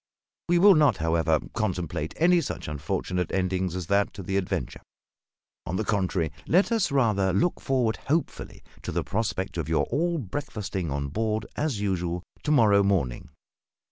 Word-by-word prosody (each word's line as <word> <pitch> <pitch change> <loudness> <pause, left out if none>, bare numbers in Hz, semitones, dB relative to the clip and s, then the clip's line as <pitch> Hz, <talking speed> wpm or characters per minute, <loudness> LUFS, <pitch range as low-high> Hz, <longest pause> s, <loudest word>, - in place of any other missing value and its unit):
We 175 - +4
will 200 +3 +8
not, 155 -4 +4
however, 80 -1 +2
contemplate 90 -7 -2
any 175 +1 +4
such 145 - -5
unfortunate 85 +4 -2
ending 95 0 0
as 90 0 -4
that 100 +3 +1
to 100 - -7
the 95 +2 -3
adventure; 95 -2 -2 0.9
on 90 - -2
the 110 - 0
contrary, 95 -6 0 0.2
let 185 +8 +3
us 220 -8 +1
rather 105 -8 +2
look 100 - +1
forward 125 -5 +1
hopefully 160 +4 -2 0.2
to - - -5
the - - -1
prospect 100 -3 -2
of 80 -2 -3
your 80 - +2
all 170 +6 +1
breakfasting 100 - -4
on 70 0 -2
board 110 +5 -1
as 145 -9 -1
usual, 90 -3 -1 0.2
to - - -4
morrow 105 -8 +5
morning. 90 -12 0
100 Hz, 160 wpm, -26 LUFS, 90-135 Hz, 0.9 s, will